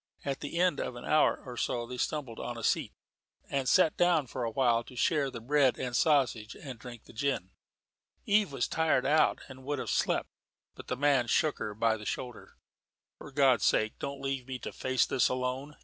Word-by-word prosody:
At 140 Hz, -1 st, -2 dB
the 145 Hz, +3 st, -5 dB
end 175 Hz, -4 st, +2 dB
of 125 Hz, -, -3 dB
an 120 Hz, -, -8 dB
hour 155 Hz, -, +3 dB
or 125 Hz, -2 st, -7 dB
so 120 Hz, 0 st, -1 dB
they 125 Hz, +1 st, -7 dB
stumbled 135 Hz, -7 st, -3 dB
on 120 Hz, -, -5 dB
a 115 Hz, -, -7 dB
seat, -, -, +1 dB, 0.6 s
and 135 Hz, -2 st, 0 dB
sat 180 Hz, -5 st, +4 dB
down 175 Hz, -4 st, +3 dB
for 125 Hz, 0 st, -5 dB
awhile 120 Hz, 0 st, +2 dB
to 125 Hz, -, -13 dB
share 140 Hz, +2 st, +1 dB
the 120 Hz, -, -7 dB
bread 130 Hz, 0 st, +2 dB
and 125 Hz, -1 st, -3 dB
sausage, 125 Hz, -8 st, +2 dB
and 130 Hz, -5 st, -9 dB
drink 120 Hz, -2 st, -10 dB
the -, -, -16 dB
gin. 120 Hz, -7 st, -2 dB, 0.7 s
Eve 205 Hz, -4 st, +3 dB
was 135 Hz, -3 st, -1 dB
tired 160 Hz, -5 st, +1 dB
out 155 Hz, +1 st, +3 dB
and 130 Hz, -1 st, -12 dB
would 145 Hz, +2 st, -2 dB
have -, -, -3 dB
slept, -, -, 0 dB, 0.4 s
but -, -, -12 dB
the 125 Hz, -, -2 dB
man 140 Hz, -3 st, +3 dB
shook 155 Hz, +5 st, +1 dB
her 105 Hz, -1 st, -4 dB
by 110 Hz, 0 st, +2 dB
the 105 Hz, -, -10 dB
shoulder. 125 Hz, -2 st, -6 dB, 0.6 s
"For 150 Hz, -, -10 dB
God's 135 Hz, -5 st, +3 dB
sake 110 Hz, 0 st, +1 dB
don't 140 Hz, 0 st, -5 dB
leave 135 Hz, -2 st, -3 dB
me 130 Hz, -1 st, -4 dB
to -, -, -7 dB
face 130 Hz, 0 st, +1 dB
this 125 Hz, -, +2 dB
alone. 130 Hz, +3 st, -3 dB
130 Hz, 205 wpm, -30 LUFS, 120-145 Hz, 0.7 s, sat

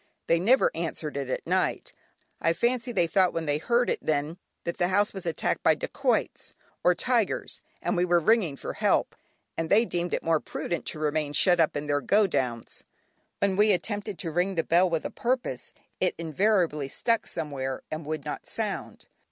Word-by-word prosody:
They 165 Hz, -, +3 dB
never 235 Hz, +9 st, +4 dB
answered 160 Hz, -2 st, -4 dB
it 140 Hz, -2 st, -3 dB
at -, -, -3 dB
night: -, -, -1 dB, 0.5 s
I 165 Hz, -, +3 dB
fancy 245 Hz, +5 st, 0 dB
they 180 Hz, -7 st, +2 dB
thought 185 Hz, +1 st, +2 dB
when 165 Hz, -1 st, -2 dB
they 145 Hz, 0 st, 0 dB
heard 240 Hz, +8 st, +2 dB
it -, -, 0 dB
then, 155 Hz, +3 st, -1 dB, 0.2 s
that 170 Hz, -, -4 dB
the 175 Hz, -, +3 dB
house 205 Hz, +3 st, +2 dB
was 190 Hz, -3 st, -6 dB
attacked 165 Hz, -, -1 dB
by -, -, +4 dB
dacoits -, -, -1 dB, 0.3 s
or 180 Hz, 0 st, +4 dB
tigers 235 Hz, 0 st, 0 dB, 0.2 s
and 230 Hz, -, 0 dB
we 175 Hz, -, +2 dB
were 175 Hz, -1 st, +3 dB
ringing 190 Hz, -5 st, +2 dB
for -, -, -6 dB
help, -, -, +1 dB, 0.4 s
and 165 Hz, 0 st, -2 dB
they 225 Hz, +4 st, +5 dB
deemed 175 Hz, -4 st, -2 dB
it -, -, -4 dB
more 165 Hz, -1 st, +2 dB
prudent 170 Hz, -, -4 dB
to -, -, -3 dB
remain 150 Hz, -1 st, -1 dB
shut 175 Hz, +2 st, +4 dB
up 160 Hz, -2 st, +2 dB
in 145 Hz, -, -4 dB
their 145 Hz, -1 st, 0 dB
"go 210 Hz, +6 st, +4 dB
downs." 125 Hz, -, -3 dB, 0.5 s
When 200 Hz, -1 st, +1 dB
we 210 Hz, +1 st, +5 dB
attempted 205 Hz, +1 st, -3 dB
to 165 Hz, -, -2 dB
ring 180 Hz, +4 st, 0 dB
the 165 Hz, -, +1 dB
bell 180 Hz, +2 st, +3 dB
with 165 Hz, -2 st, -1 dB
a -, -, -3 dB
purpose, 240 Hz, -, -2 dB, 0.3 s
it 185 Hz, -, +1 dB
invariably 170 Hz, -3 st, +1 dB
stuck 230 Hz, -, 0 dB
somewhere 135 Hz, -5 st, -4 dB
and 155 Hz, +1 st, -4 dB
would 155 Hz, -2 st, -4 dB
not -, -, -5 dB
sound. -, -, -4 dB
170 Hz, 195 wpm, -27 LUFS, 155-200 Hz, 0.5 s, they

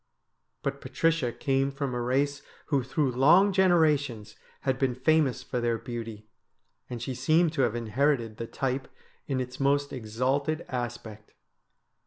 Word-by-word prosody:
But -, -, -3 dB
Patricia 165 Hz, -7 st, 0 dB
came 135 Hz, +1 st, 0 dB
from 140 Hz, -2 st, -3 dB
a 120 Hz, -, -2 dB
race 140 Hz, +3 st, 0 dB, 0.3 s
who 140 Hz, -3 st, +2 dB
through 135 Hz, +2 st, 0 dB
long 170 Hz, +11 st, +5 dB
generations 150 Hz, -, +2 dB, 0.3 s
had 130 Hz, -1 st, -1 dB
been 130 Hz, -3 st, +1 dB
famous 140 Hz, 0 st, +2 dB
for 125 Hz, -, -3 dB
their 120 Hz, -1 st, +1 dB
beauty, 115 Hz, -2 st, -7 dB, 0.6 s
and 120 Hz, -, -5 dB
she 130 Hz, +3 st, -4 dB
seemed 155 Hz, +6 st, +2 dB
to 145 Hz, -, 0 dB
have 120 Hz, -3 st, +1 dB
inherited 120 Hz, 0 st, 0 dB
the 115 Hz, -, -5 dB
type 130 Hz, +1 st, -2 dB, 0.4 s
in 135 Hz, -2 st, -1 dB
its 125 Hz, 0 st, -5 dB
most 140 Hz, +1 st, +1 dB
exalted 130 Hz, +7 st, -1 dB
aspect. 120 Hz, -4 st, -6 dB
130 Hz, 145 wpm, -28 LUFS, 120-145 Hz, 0.6 s, long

